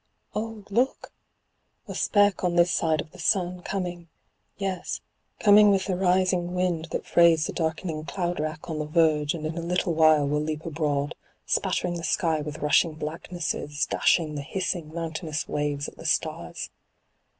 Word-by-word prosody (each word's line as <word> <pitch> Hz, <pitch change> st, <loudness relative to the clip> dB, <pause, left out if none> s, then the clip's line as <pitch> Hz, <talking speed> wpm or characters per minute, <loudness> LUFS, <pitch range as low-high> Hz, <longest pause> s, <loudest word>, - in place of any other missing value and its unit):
Oh, 220 Hz, 0 st, -4 dB
look! 245 Hz, +6 st, 0 dB, 0.7 s
a -, -, -5 dB
speck 205 Hz, -2 st, +2 dB
on 175 Hz, -1 st, +1 dB
this 175 Hz, +1 st, +4 dB
side 160 Hz, -2 st, +1 dB
of 155 Hz, -, -12 dB
the -, -, -15 dB
sun, 180 Hz, -3 st, +1 dB
coming— 175 Hz, -3 st, -4 dB, 0.5 s
yes, 190 Hz, -3 st, -3 dB, 0.4 s
coming 210 Hz, 0 st, +7 dB
with 195 Hz, -1 st, +2 dB
the 190 Hz, -, -1 dB
rising 180 Hz, -1 st, +1 dB
wind 180 Hz, -3 st, 0 dB
that -, -, -4 dB
frays 165 Hz, -2 st, +5 dB
the -, -, -4 dB
darkening 160 Hz, -1 st, -2 dB
cloud 175 Hz, +2 st, -2 dB
wrack 155 Hz, +1 st, -4 dB
on 160 Hz, -2 st, -3 dB
the 150 Hz, -, -3 dB
verge 150 Hz, -1 st, +2 dB
and 155 Hz, -2 st, -5 dB
in 155 Hz, +1 st, -3 dB
a -, -, -3 dB
little 175 Hz, 0 st, 0 dB
while 155 Hz, -2 st, +5 dB
will 150 Hz, +1 st, 0 dB
leap 155 Hz, 0 st, -4 dB
abroad, 145 Hz, -3 st, -1 dB, 0.3 s
spattering 175 Hz, -1 st, 0 dB
the 170 Hz, -, -7 dB
sky 165 Hz, -3 st, +1 dB
with 150 Hz, +1 st, -6 dB
rushing 155 Hz, +2 st, +3 dB
blacknesses, 155 Hz, -1 st, -3 dB
dashing 160 Hz, -3 st, +2 dB
the 145 Hz, -, -4 dB
hissing 175 Hz, 0 st, -3 dB
mountainous 160 Hz, -1 st, -3 dB
waves 145 Hz, -1 st, -2 dB
at -, -, -11 dB
the -, -, -11 dB
stars. -, -, -2 dB
165 Hz, 165 wpm, -26 LUFS, 155-180 Hz, 0.7 s, coming